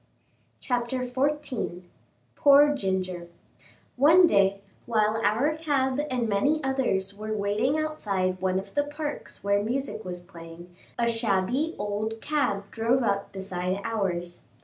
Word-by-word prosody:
CHAPTER 245 0 -1
XIV 255 -7 -2 0.5
POOR 290 +1 +6
GINGER 185 -7 -2 0.7
One 325 +7 +7
day, 200 - +3 0.3
while 220 -1 +1
our 235 +9 +2
cab 285 -4 0
and 245 -3 0
many 280 +10 +2
others 245 -8 0
were 215 +1 -4
waiting 210 +8 +1
outside 200 -12 -1
one 185 0 +1
of 195 +1 -5
the 290 - +2
parks 295 0 -6
where 200 0 +2
music 245 +1 -3
was 180 -1 -6
playing, 175 0 -12 0.2
a 235 - +1
shabby 230 - 0
old 210 +2 -3
cab 275 -8 0
drove 235 +3 +1
up 200 -2 -1
beside 190 -1 -3
ours. 175 -6 -2
220 Hz, 125 wpm, -27 LUFS, 195-270 Hz, 0.7 s, One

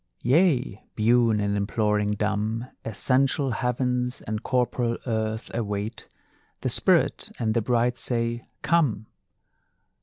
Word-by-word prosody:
Yea, 130 - +2
biune 115 0 +3
in 100 0 0
imploring 105 0 0
dumb, 105 +3 -1 0.2
Essential 130 +5 +1
Heavens 125 +1 -1
and 110 0 -4
corporal 125 -2 0
Earth 110 -2 -2
await; 105 0 -3 0.5
The - - 0
Spirit - - +2
and 110 -2 0
the 115 - +1
Bride 120 +1 +1
say: 120 -1 -1 0.2
Come! 140 -11 +2
115 Hz, 110 wpm, -25 LUFS, 105-125 Hz, 0.5 s, biune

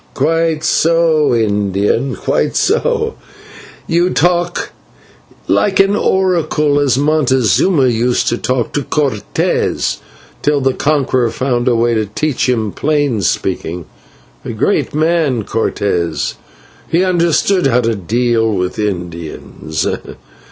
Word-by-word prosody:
"Quite 165 -1 0
so, 160 -1 +2
Indian, 105 +3 0
quite - - -1
so, 455 -2 +1 0.7
you 175 +2 +1
talk 175 +1 0 0.8
like 195 -2 +1
an 195 +1 +4
oracle, 170 -7 +1
as 135 -3 +2
Montezuma 140 - +2
used 120 0 +1
to 120 - -1
talk 120 0 -1
to 145 - 0
Cortes 140 -7 -1 0.4
till 145 0 +1
the 135 -1 +1
Conqueror 135 -5 +1
found 130 -1 -1
a 125 - +3
way 120 +1 +2
to 110 -2 0
teach 135 +5 -1
him 110 -4 0
plain 145 -6 0
speaking 85 -1 -2 0.6
a - - -5
great - - 0
man, 155 -7 +1
Cortes, 90 -6 -1 0.6
he 170 +3 +2
understood 175 0 +2
how 125 -1 +2
to 115 -1 0
deal 115 +3 0
with 90 -1 -2
Indians." 85 -5 -4
130 Hz, 115 wpm, -15 LUFS, 110-160 Hz, 0.8 s, an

